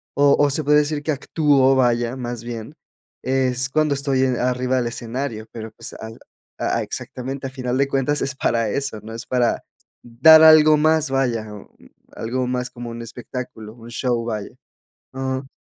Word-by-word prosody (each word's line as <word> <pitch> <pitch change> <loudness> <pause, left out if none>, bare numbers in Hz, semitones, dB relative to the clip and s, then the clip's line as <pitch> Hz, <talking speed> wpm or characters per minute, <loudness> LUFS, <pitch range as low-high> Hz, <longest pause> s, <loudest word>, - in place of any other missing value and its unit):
o 140 0 +5
o 145 - +4
se 150 +3 -2
puede 150 +1 +4
decir 150 0 -1
que 155 - 0
actúo, 140 -2 +2
vaya, 120 -1 +1
más 120 -2 -5
bien, 115 -2 -7 0.5
es 130 0 0
cuando 155 0 +1
estoy 135 -1 0
en 130 -2 +1
arriba 125 +1 0
del 120 -2 0
escenario, 120 -1 -4
pero, 110 -1 -7
pues, - - -7
al 110 0 -8 0.4
a - - -1
a - - 0
exactamente. 135 +2 -6
Al 130 - -11
final 125 -1 -2
de 140 0 +2
cuentas, 140 +2 0
es 140 0 -2
para 115 -4 0
eso, 140 -2 -3
¿no?, 110 +1 -9
es 115 - -7
para 125 -2 0 0.4
dar 140 +7 +7
algo 155 -1 +8
más, 155 -1 +2
vaya, 120 -5 -1
o 100 - -13 0.4
algo 125 +3 -3
más 125 0 -2
como 120 -1 -8
un 115 0 -7
espectáculo, 115 -2 -8
un 115 0 -13
show, 120 -1 -1
vaya. 110 -3 -4 0.6
Am 130 0 -3
130 Hz, 180 wpm, -21 LUFS, 120-140 Hz, 0.6 s, algo